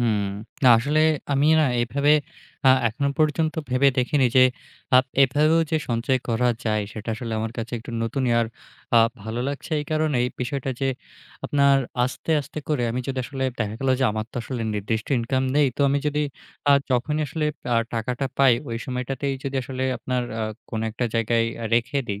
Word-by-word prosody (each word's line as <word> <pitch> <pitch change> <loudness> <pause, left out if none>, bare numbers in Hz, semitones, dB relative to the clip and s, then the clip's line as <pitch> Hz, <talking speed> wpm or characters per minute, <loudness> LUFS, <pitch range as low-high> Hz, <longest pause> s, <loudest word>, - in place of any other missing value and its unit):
হুম। 110 -3 +2 0.4
না, - - +8
আসলে 145 +6 +1 0.3
আমি 140 +1 +3
না? - - +4 0.2
এভাবে 140 +5 +2 0.5
আ - - +9 0.2
এখনো 140 +6 -1
পর্যন্ত 155 0 +1 0.2
ভেবে 130 +2 +4
দেখিনি 130 +1 +2
যে, 130 - +8 0.5
আ - - +10 0.3
এভাবেও 150 +5 +3
যে 160 - +2
সঞ্চয় 120 +2 +1
করা 120 +1 +2 0.2
যায়, 110 -2 +1
সেটা 110 +1 -8
আসলে 115 0 -5
আমার 110 +1 -3
কাছে 115 +1 -5
একটু 115 - -10
নতুনই 125 +2 -1
আ - - +4 0.6
আর 115 0 +6
ভালো 110 +3 -4
লাগছে 140 +4 -6
এই - - -5
কারণেই 155 -6 +1
বিষয়টা 135 +2 -2
যে, 135 - +1 0.6
আপনার 140 -1 +4 0.3
আস্তে, 130 +5 -5
আস্তে 145 +2 -8
করে 150 -5 +1
আমি 125 +2 -2
যদি 135 -1 -2
আসলে 135 +1 -4
দেখা 110 -2 -2
গেলো 135 -1 +2
যে, - - +3
আমার 110 0 -2
তো - - -9
আসলে 120 0 -4
নির্দিষ্ট 110 +2 -2
ইনকাম 130 +3 0
নেই। 150 -1 +5
তো - - -4
আমি 140 +1 +2
যদি 150 0 0 0.5
আ - - +8 0.2
যখনই 140 +5 +1
আসলে 150 +2 -3 0.3
আ - - +4 0.2
টাকাটা 125 +4 -2
পাই, 135 -2 +6
ঐ - - -7 0.2
সময়টাতেই 130 +2 -2
যদি 135 0 -2
আসলে 130 +1 -5 0.2
আপনার 125 -1 -2 0.2
আ - - 0 0.3
কোনো 110 -1 -2
একটা 120 +3 -3
জায়গায় 115 0 +2 0.2
আ - - -3
রেখে 120 +4 +1
দেই। 100 0 -4
130 Hz, 185 wpm, -24 LUFS, 115-140 Hz, 0.6 s, আ